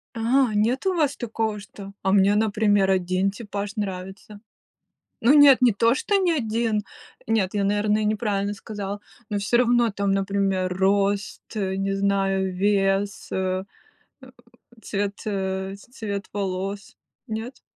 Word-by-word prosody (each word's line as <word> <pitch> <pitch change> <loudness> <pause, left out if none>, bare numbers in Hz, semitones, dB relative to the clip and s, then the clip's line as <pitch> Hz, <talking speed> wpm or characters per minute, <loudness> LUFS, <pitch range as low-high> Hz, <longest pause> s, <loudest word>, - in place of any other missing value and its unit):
А, 235 +1 +2
нет 235 - +1
у 375 - +2
вас 295 -4 +1
такого, 220 -3 -2
что 200 0 -11
а 190 - +1
мне, 200 +1 +4
например, 205 -2 +2
один 185 +1 +1
типаж 205 -1 -6
нравится. 195 +1 -6 0.8
Ну 235 +4 +5
нет, 285 -3 +8
не 245 - +6
то 230 +4 +3
что 405 +9 0
ни 370 -3 +2
один, 225 -5 0 0.4
нет, 215 -4 +1
я, 200 - +1
наверное, 210 +1 +1
неправильно 205 -1 -1
сказала, 205 -1 -6 0.3
но 205 - -1
всё 200 +4 +1
равно 240 -1 +3
там, 200 -1 -1
например, 195 -2 0
рост, 200 +1 +1
э, 190 -2 -2
не 195 0 -1
знаю, 195 -1 0
вес, 195 0 0
э, 185 0 -1 0.6
э, 260 - -13 0.5
цвет, 200 0 -3
э, 190 -1 -2
цвет 205 -2 -6
волос, 195 0 -4 0.3
нет? 225 +3 -6
205 Hz, 140 wpm, -24 LUFS, 195-220 Hz, 0.8 s, нет